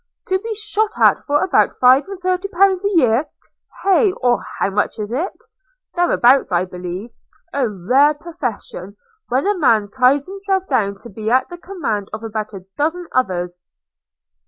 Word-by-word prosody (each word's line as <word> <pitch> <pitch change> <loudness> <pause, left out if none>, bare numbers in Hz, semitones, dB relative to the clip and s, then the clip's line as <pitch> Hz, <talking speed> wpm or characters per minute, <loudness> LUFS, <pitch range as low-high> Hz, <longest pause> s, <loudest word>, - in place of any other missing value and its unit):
– - - -44
To 375 0 +2
be 450 +2 -5
shot 430 0 -1
at - - +5
for 290 0 0
about 375 - +2
five 255 +3 +5
and 390 -2 -7
thirty 370 +1 -1
pounds 385 0 +2
a 405 - +2
year! 255 0 +3 0.6
Hey? 390 +2 +4
Or 245 -6 0
how 195 - 0
much 210 +4 -1
is 210 0 -5
it? 305 +10 -1 0.6
Thereabouts, 275 - +3
I 175 +1 +1
believe. 180 +4 -7 0.3
– - - -43
A 270 -4 0
rare 255 +10 +3
profession, 245 - -6 0.3
when 260 +6 +1
a 410 +1 +2
man 225 - +2
ties 265 +2 +3
himself 390 -1 -2
down 200 -7 0
to 235 - -10
be 215 +2 -4
at 255 +2 +2
the 350 - -8
command 245 - -4
of 215 +1 -6
about 215 -1 -4
a 190 -3 -10
dozen 325 +4 -1
others!' 180 -7 -1
260 Hz, 175 wpm, -19 LUFS, -, 0.6 s, at